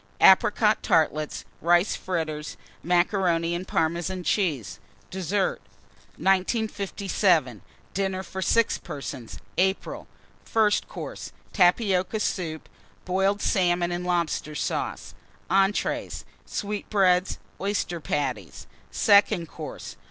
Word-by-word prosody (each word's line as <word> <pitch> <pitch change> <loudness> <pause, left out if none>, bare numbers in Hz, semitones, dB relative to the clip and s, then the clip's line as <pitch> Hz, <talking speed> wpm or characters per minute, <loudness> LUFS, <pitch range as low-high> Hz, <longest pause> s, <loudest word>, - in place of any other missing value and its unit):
Apricot 210 +3 +5
Tartlets. 155 -1 +1 0.2
Rice 175 +4 +3
Fritters. 155 -4 -4 0.2
Macaroni 175 -1 +1
and 180 +2 -4
Parmesan 170 +3 -1
Cheese. 155 - -1 0.3
DESSERT. 190 +1 -1 0.6
1957. 195 0 +1 0.3
DINNER 190 -1 -1
FOR 190 +1 -6
6 230 +5 +2
PERSONS 135 -4 -7 0.2
(April). 190 +1 0 0.4
FIRST 215 -2 +2
COURSE. - - -7 0.2
Tapioca 190 +1 +2
Soup. 165 -6 -3 0.4
Boiled 195 +2 +1
Salmon 175 -2 +2
and 175 0 -3
Lobster 170 -4 -1
Sauce. - - -3 0.4
ENTREES. 195 +2 +1 0.2
Sweetbreads. 195 -3 +1 0.2
Oyster 195 -3 -1
Patties. 130 - -3 0.2
SECOND 200 -5 +3
COURSE. 155 -4 -8
180 Hz, 90 wpm, -26 LUFS, 165-195 Hz, 0.6 s, Apricot